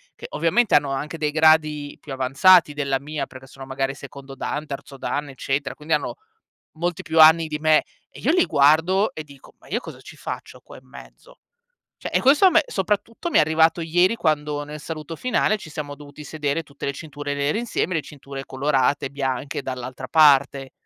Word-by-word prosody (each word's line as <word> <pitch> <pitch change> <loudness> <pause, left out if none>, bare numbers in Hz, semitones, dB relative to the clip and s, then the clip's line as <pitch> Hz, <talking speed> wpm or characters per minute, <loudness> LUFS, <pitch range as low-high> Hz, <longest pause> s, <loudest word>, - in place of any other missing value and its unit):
che - - -9
ovviamente 180 +9 +2
hanno 145 -1 +3
anche 145 +4 -4
dei 150 -1 -1
gradi 155 -2 +2
più 140 - -8
avanzati 145 +6 +4
della 140 -2 -1
mia 150 +2 -4
perché 130 0 -13
sono 135 0 -11
magari 135 +1 -3
secondo 140 -1 -11
dan, 145 +3 -4
terzo 140 0 -8
dan, 145 0 -3
eccetera, 135 +1 -3
quindi 155 +2 -3
hanno 150 - -4 0.6
molti 175 0 -2
più 160 0 0
anni 160 +1 +7
di 150 -1 -4
me, 155 0 +4 0.3
e - - -14
io - - +2
li 360 +1 +4
guardo 160 +8 +3
e 155 - -6
dico:" 140 -3 -17
Ma - - -20
io - - -1
cosa - - -10
ci - - -13
faccio - - -8
qua - - -14
in - - -26
mezzo?" - - -15 0.6
Cioè, - - -6
e - - +2
questo 285 +8 +5
a - - +7
me 330 -2 +4
soprattutto 210 - -2
mi - - 0
è - - +7
arrivato 160 +2 +3
ieri 175 +7 +2
quando 150 -3 -1
nel 150 +1 -9
saluto 160 0 -7
finale 250 -3 +1
ci 160 - -11
siamo 150 -1 -6
dovuti 145 +1 -12
sedere, 150 0 -2
tutte 140 -1 -11
le 140 - -1
cinture 145 0 -6
nere 145 +3 -1
insieme, 230 -5 -2
le 155 - 0
cinture 140 -1 -9
colorate 135 +1 0
e - - -6
bianche 135 0 -3
dall'altra 130 -1 -6
parte. 140 -3 +4
150 Hz, 200 wpm, -22 LUFS, 140-160 Hz, 0.6 s, anni